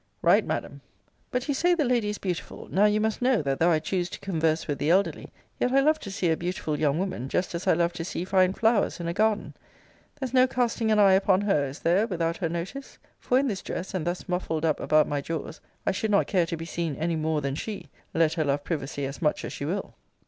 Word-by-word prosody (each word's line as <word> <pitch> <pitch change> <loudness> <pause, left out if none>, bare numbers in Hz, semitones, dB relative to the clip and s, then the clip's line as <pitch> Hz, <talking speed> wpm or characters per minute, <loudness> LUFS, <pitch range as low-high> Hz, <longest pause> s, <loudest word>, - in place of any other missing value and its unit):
Right, - - +5
Madam. - - -4 0.5
But 250 +2 -2
you 285 - +1
say 350 +6 +3
the 310 -4 +1
lady 240 -4 +1
is 210 - -3
beautiful. 180 -4 -5
Now 200 +3 +4
you 210 0 +3
must 220 +2 -1
know, 250 -7 +3
that 135 -1 -1
though 170 - +4
I 165 - +4
choose 175 +3 -2
to - - -8
converse 160 -4 0
with 145 -2 -2
the 150 - 0
elderly, 190 +4 +1 0.3
yet 250 - +1
I 270 - +5
love 305 +3 +3
to 200 - -8
see 185 -3 0
a - - +3
beautiful 170 -3 -3
young 150 -1 +2
woman, 180 -9 -3
just 180 +4 -1
as 170 +1 -4
I - - +6
love 170 +1 +1
to 175 - -5
see 175 +1 -4
fine 185 -1 +3
flowers 220 -6 +1
in 170 - -4
a 170 - -1
garden. 215 +2 +1 0.7
There's 265 -3 -4
no 255 0 +5
casting 240 -3 0
an 215 - +4
eye 200 -2 +6
upon 190 0 +3
her, 195 -9 +1
is 135 +2 -8
there, 185 +7 +3
without 170 -4 -1
her 170 - -1
notice? 180 +12 -6 0.2
For 250 - +1
in 275 +1 +2
this 195 -6 -2
dress, 185 - -5
and 175 -3 -2
thus 175 +1 -3
muffled 165 -3 -1
up 155 -2 +1
about 155 0 +3
my 145 -1 -1
jaws, 160 +1 -5 0.2
I - - +2
should 210 +3 -2
not 200 -1 +3
care 180 -4 +1
to 165 - -3
be 165 - -6
seen 165 -3 -3
any 165 +3 -1
more 155 -1 0
than 140 -1 -2
she, 205 +8 -6 0.2
let 160 -1 +3
her 160 - 0
love 145 0 0
privacy 145 -3 -3
as 135 +1 -6
much 150 -2 0
as - - -6
she 140 - -5
will. 185 +7 -3
180 Hz, 250 wpm, -26 LUFS, 160-210 Hz, 0.7 s, I